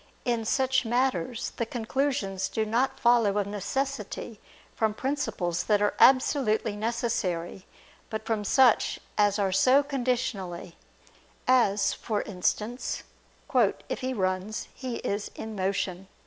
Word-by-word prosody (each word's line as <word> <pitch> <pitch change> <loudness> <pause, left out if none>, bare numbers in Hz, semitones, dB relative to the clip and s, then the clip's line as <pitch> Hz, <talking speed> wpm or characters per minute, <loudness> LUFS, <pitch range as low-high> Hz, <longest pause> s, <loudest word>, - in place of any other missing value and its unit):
In 235 -3 0
such 265 +3 +2
matters 240 -3 0
the 235 - 0
conclusions 225 -5 -1
do 220 - -1
not 235 +5 0
follow 235 -4 +4
of 205 - +1
necessity 215 +1 -4 0.3
from 220 -1 0
principles 255 - -2
that 210 -2 +3
are 205 0 +2
absolutely 245 -5 +4
necessary, 205 -6 -2 0.4
but 220 - -4
from 220 -2 -1
such 250 +3 +4 0.2
as 205 0 +3
are 195 -2 +1
so 255 +9 +5
conditionally; 240 - -2 0.7
as, 230 -6 +3
for 215 -3 -2
instance, 210 +5 -2 0.5
"If - - +1
he 260 0 -2
runs, 190 -1 -2
he 255 -3 -5
is 205 +1 -2
in 220 -1 -6
motion." 190 -1 -2
220 Hz, 120 wpm, -27 LUFS, 200-255 Hz, 0.7 s, so